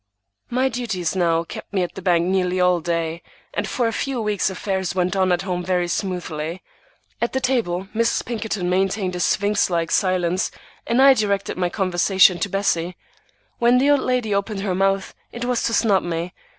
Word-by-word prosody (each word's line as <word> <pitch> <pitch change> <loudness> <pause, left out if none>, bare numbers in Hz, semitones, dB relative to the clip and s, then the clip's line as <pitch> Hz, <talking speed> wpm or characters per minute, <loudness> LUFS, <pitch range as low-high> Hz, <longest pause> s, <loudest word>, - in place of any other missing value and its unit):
My 255 +2 +1
duties 225 -9 -2
now 170 -2 +2
kept - - -9
me 190 -3 +1
at 175 - -4
the 190 - -8
bank 175 -2 +2
nearly 185 0 0
all 180 -1 +3
day, 165 0 -2 0.3
and - - -2
for 245 -2 0
a 225 - -2
few 270 +1 -2
weeks 210 -3 0
affairs 190 0 -3
went 180 +1 0
on 190 -1 +2
at 175 +1 +1
home 180 -2 -2
very 180 -1 0
smoothly. 175 -3 -3 0.6
At 235 - 0
table 195 -8 0
Mrs. 230 +1 +1
Pinkerton 215 -5 -3
maintained 190 +1 0
a - - -4
sphinx 205 +3 +1
like 170 -2 -1
silence, 185 -1 +1 0.4
and 245 +3 +3
I 275 0 +8
directed 200 -4 -1
my 180 -1 0
conversation 185 0 +3
to 200 - -1
Bessie. 180 -3 -1 0.6
When 240 +1 +4
the 275 +3 +4
old 290 - +4
lady 250 -5 0
opened 200 0 -1
her 195 -2 -1
mouth, 195 +1 0 0.2
it 240 +1 -5
was 245 -1 0
to - - 0
snub 200 -5 +3
me. 170 +1 -4
190 Hz, 185 wpm, -22 LUFS, 180-215 Hz, 0.6 s, I